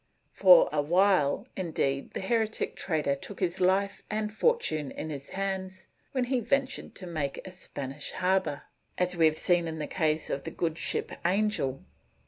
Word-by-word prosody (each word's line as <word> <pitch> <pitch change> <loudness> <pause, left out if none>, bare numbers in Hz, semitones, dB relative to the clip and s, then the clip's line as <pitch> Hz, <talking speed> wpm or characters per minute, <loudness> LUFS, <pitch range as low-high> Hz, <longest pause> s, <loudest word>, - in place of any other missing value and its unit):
For - - +7
awhile, 180 - +2
indeed, 140 -6 -2
the - - -2
heretic 220 +2 0
trader 155 -5 0
took 165 +8 -8
his 185 0 -1
life 195 +2 +2
and 215 0 -2
fortune 220 - +1
in 155 - -6
his 140 -1 -7
hands 190 -1 -4 0.3
when 260 -2 0
he 250 +1 0
ventured 270 +3 -1
to 185 - -5
make 155 -5 -3
a 185 - -7
Spanish 145 -6 -5
harbor, 185 -5 0 0.3
as 180 0 +1
we 165 -2 +5
have 155 0 0
seen 175 -1 +2
in 160 0 -4
the 155 - -3
case 155 -2 0
of 140 - -2
the - - -4
good 165 -2 -2
ship - - -1
Angel. 180 -8 0
180 Hz, 165 wpm, -29 LUFS, 155-200 Hz, 0.3 s, For